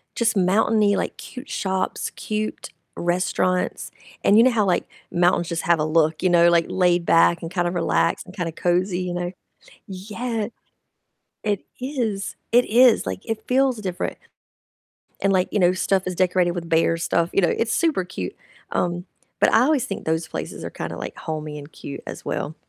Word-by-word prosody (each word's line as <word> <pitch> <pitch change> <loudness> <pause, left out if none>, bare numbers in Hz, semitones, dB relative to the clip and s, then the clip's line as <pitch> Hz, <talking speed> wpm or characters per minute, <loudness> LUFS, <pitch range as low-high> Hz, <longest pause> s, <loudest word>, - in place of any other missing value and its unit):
just 230 -1 +1
mountainy, 205 +2 +3
like, - - -2
cute 255 +3 -10
shops, 190 -1 -2
cute 215 0 -4 0.3
restaurants, 180 +1 0 0.3
and 205 - +6
you 230 - +8
know 255 - +5
how, 220 -3 +2
like, 180 -3 +1 0.2
mountains 175 0 +2
just 170 -1 -2
have 170 -1 +3
a 150 - +1
look, 155 0 +2
you 185 - +3
know, 170 -1 +6
like 170 -1 +3
laid 175 -2 +2
back, 170 +1 +4
and 165 - -5
kind 175 0 0
of 175 - -2
relaxed, 170 - +1
and 185 - -13
kind 175 -3 -2
of 165 - -10
cozy, 180 +1 +1
you 180 -1 -3
know 175 0 -3 0.6
Yeah, 215 +4 -4 1.0
it 205 -2 -1 0.2
is 240 -7 -3 0.2
it 245 +1 +6
is, 240 - +5
like, 95 0 -3
it 220 -1 -2
feels 260 -1 +2
different, 185 -3 -4 1.0
and 195 - +3
like, 185 -1 +2
you - - +1
know, 180 -2 +4
stuff 190 +1 +1
is 185 - -2
decorated 180 0 +2
with 170 -1 -5
bear 165 0 +3
stuff, 170 0 0
you - - +3
know, 175 - +3
it's 230 0 0
super 290 - +1
cute, 95 - -6 0.4
um, 175 +1 -1 0.3
but - - +4
I 220 - +6
always 275 -1 +2
think 195 - -5
those 160 0 -1
places - - -6
are - - -3
kind - - -6
of, - - -7
like, - - -6
homey 155 -1 -5
and 145 +1 -11
cute 140 - -8
as - - -7
well. - - -3
185 Hz, 190 wpm, -23 LUFS, 170-215 Hz, 1.0 s, you